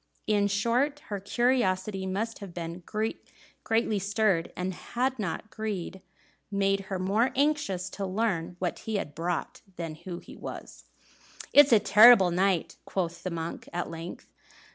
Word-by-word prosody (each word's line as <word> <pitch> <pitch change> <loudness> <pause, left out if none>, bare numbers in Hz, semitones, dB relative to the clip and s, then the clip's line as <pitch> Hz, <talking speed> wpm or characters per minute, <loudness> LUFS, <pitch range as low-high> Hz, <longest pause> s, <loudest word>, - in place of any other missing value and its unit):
In 205 -1 +2
short, 240 +9 +1
her 205 -2 -2
curiosity 195 -4 0
must 220 +5 -3
have 195 -4 -9
been 170 +1 -5 0.8
greatly 225 -2 +1
stirred, 200 -3 +1
had 240 +8 -2
not 205 +2 -4
greed 200 -4 -4 0.5
made 195 -1 +1
her 190 - -1
more 200 +7 +2
anxious 275 -11 +1
to 195 -1 -4
learn 185 -4 -1
what 180 -1 -2
he 220 - -4
had 150 -7 -3
brought 170 +2 -3
than 165 -3 -5
who 170 +3 -7
he - - -12
was. - - -9 0.7
"It's 285 0 +8
a 225 - +8
terrible 210 -3 +8
night," 185 -1 +1
quoth 175 -3 -3
the 185 - -3
monk, 165 -1 -5
at 175 +1 -3
length. 165 +1 -7
195 Hz, 140 wpm, -28 LUFS, 175-220 Hz, 0.8 s, It's